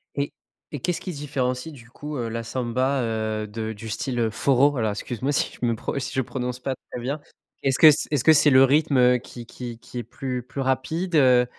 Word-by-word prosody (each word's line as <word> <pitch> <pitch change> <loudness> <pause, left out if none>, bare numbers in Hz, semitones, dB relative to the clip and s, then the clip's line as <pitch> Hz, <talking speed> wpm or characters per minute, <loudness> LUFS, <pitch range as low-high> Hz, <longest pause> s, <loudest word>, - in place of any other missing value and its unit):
Et 140 0 -2 0.4
et 145 - -3
qu'est-ce 175 +6 -2
qui 185 - -5
se - - -8
différencie, 135 0 -2
du 120 -4 -14
coup, 150 +4 -7
heu, 120 -2 -2
la 115 +1 -4
samba, 130 +3 -1
heu, 110 -1 -2
de 110 +1 -4
du 110 +1 -9
style, 120 +3 -3
heu, 115 -1 +2
forró? 135 +5 +3
Voilà, 115 -6 -1
excuse-moi 125 +6 -3
si - - 0
je - - +1
me 115 -1 +1
pro 110 - -4
si 130 - -5
je 130 - +1
prononce 125 0 -4
pas 130 +1 -3 0.2
très 125 - -5
bien. 140 +5 -3 0.4
Est-ce 135 -1 +2
que 155 - +9
ce 145 - -1
est-ce 145 -5 0
que 160 - +7
c'est 150 0 +5
le 130 -1 +7
rythme, 145 +1 +3
heu, 125 0 +5
qui 120 0 -10
qui 120 -1 -8
qui 125 - -8
est - - -4
plus 125 +2 -5
plus 135 +3 -6
rapide, 160 +7 -1
heu, 125 -4 +5
125 Hz, 240 wpm, -24 LUFS, 120-140 Hz, 0.4 s, que